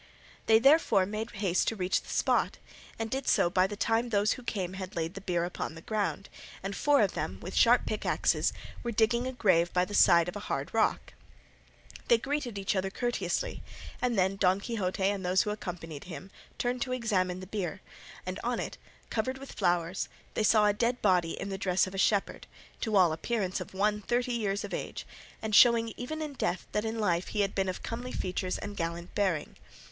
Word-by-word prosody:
They 220 - +7
therefore 230 - +5
made 215 +3 -4
haste 195 -4 0
to 225 - +1
reach 185 -2 0
the - - -15
spot, - - +1 0.4
and 225 -1 -4
did 270 0 -2
so 175 - +3
by 185 +1 +3
the 205 - -6
time 225 +3 +1
those 210 -1 +2
who - - -9
came 190 -6 -3
had 190 -1 -7
laid 165 0 -2
the 195 - -8
bier 175 -3 0
upon 175 -2 -4
the 165 - -10
ground, 205 -2 -2 0.4
and 195 0 -3
four 290 +5 +4
of - - +3
them - - -3
with - - -7
sharp - - +5
pickaxes - - +1 0.3
were 240 - -3
digging 235 +3 +2
a - - -2
grave 185 -8 +2
by 180 0 +3
the 205 - -9
side 170 -4 +6
of 180 - -5
a - - -4
hard - - -2
rock. - - +1 0.9
They 235 - +6
greeted 270 -3 -3
each 195 +1 -1
other 190 0 0
courteously, 245 - -2 0.4
and 245 -3 +1
then 190 +1 +2
Don 190 0 +3
Quixote 200 -3 -2
and 195 0 +1
those 180 +1 +3
who 210 - -2
accompanied 170 -7 -6
him 185 +2 -9 0.3
turned 245 0 -1
to 255 0 -1
examine 190 -7 0
the 185 - -7
bier, 190 -1 -4 0.4
and 185 +2 -4
on 240 0 -1
it, - - -5 0.3
covered 255 +4 -1
with 275 0 -10
flowers, 175 +1 0 0.2
they - - -1
saw 215 0 +5
a 205 - +4
dead 235 +3 0
body 180 -5 +2
in 200 - -4
the 195 0 -4
dress 185 -1 +2
of 185 - -8
a 195 - -3
shepherd, 200 0 +1 0.3
to 220 -2 -1
all 180 -5 +5
appearance 190 +2 -2
of - - -9
one 210 +2 +1
thirty 245 +4 0
years 205 -4 -1
of - - -6
age, - - -4 0.4
and 220 -1 -3
showing 230 0 +6
even 310 +6 -4
in 300 -2 -5
death 190 -8 -2
that 210 +1 -1
in 220 +1 -2
life 180 -5 +1
he 210 - -1
had 195 -1 0
been 190 -1 0
of 185 - -5
comely 245 +2 -5
features 185 -2 -2
and 205 0 -6
gallant 170 0 -4
bearing. 185 -7 -1
200 Hz, 210 wpm, -30 LUFS, 185-230 Hz, 0.9 s, They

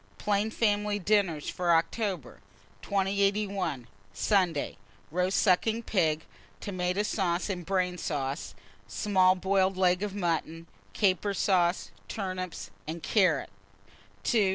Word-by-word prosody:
PLAIN 210 +1 0
FAMILY 210 -2 +1
DINNERS 190 -6 +1
FOR 180 -1 -2
OCTOBER. 170 - -2 0.4
2081. 195 - 0 0.3
Sunday. 180 -8 +1 0.4
1. 180 +3 0
Roast 185 +2 +1
sucking 220 +4 +2
pig, 160 -7 +1 0.3
tomata 185 0 -1
sauce 185 -1 0
and 180 -2 -4
brain 180 -2 0
sauce; 135 -9 -3 0.3
small 185 -3 +3
boiled 190 0 +1
leg 180 -1 +3
of 205 -1 -3
mutton, 165 -3 -2 0.3
caper 200 0 +1
sauce, 180 -2 +1 0.2
turnips, 185 -3 -5 0.2
and 160 +1 -5
carrots. 180 - +2
185 Hz, 105 wpm, -29 LUFS, 170-200 Hz, 0.4 s, small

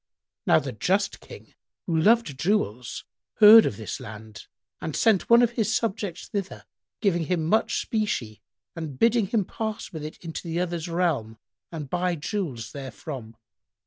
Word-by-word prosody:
Now - - +6
the 135 - -2
just 190 - 0
King, - - -13 0.3
who 170 - -1
loved 165 - +3
jewels, 135 - -1 0.3
heard 220 +1 +9
of 100 - -4
this 110 - -5
land 110 0 -10 0.3
and 160 - -4
sent 220 -5 +2
one 235 +1 +7
of 240 - +2
his 220 -2 0
subjects 205 -5 -2
thither, 200 -2 -5 0.4
giving 175 -6 +1
him 165 -1 0
much 220 +7 +2
specie 165 - -2 0.3
and 155 -5 -6
bidding 230 - +3
him 210 -1 0
pass 220 0 -5
with 155 -2 -6
it 155 - -7
into 165 - -5
the 165 +1 -2
other's 175 -2 -2
realm 160 -11 -1 0.3
and 155 -4 -6
buy 180 +4 0
jewels 145 - -4
therefrom. 130 -3 -8
170 Hz, 155 wpm, -25 LUFS, 135-210 Hz, 0.4 s, heard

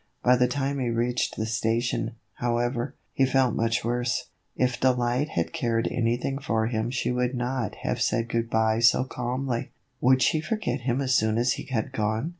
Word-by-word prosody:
By 125 - +6
the 125 0 +3
time 140 +2 -1
he 125 -2 0
reached 120 +1 0
the 110 - -2
station, 115 0 -1 0.2
however, 120 0 -1 0.2
he 135 - +2
felt 130 -3 +2
much 115 +1 0
worse. 120 +1 -1 0.3
If 125 -1 0
Delight 125 +2 +1
had - - -2
cared 120 -7 0
anything 120 +3 0
for 115 -6 0
him 110 0 -1
she 125 0 -1
could 125 +1 0
not 125 -3 -2
have - - -1
said 115 0 +1
good 115 0 -1
by 110 -1 +2
so 120 +2 +5
calmly. 125 -1 -3 0.3
Would 130 0 +4
she 155 +4 +2
forget 155 - -2
him 125 +3 +1
as 130 -1 +1
soon, 110 -2 +2
as 120 +2 +2
he - - -6
had 115 -5 -2
gone 110 +7 -1
120 Hz, 185 wpm, -26 LUFS, 115-130 Hz, 0.3 s, By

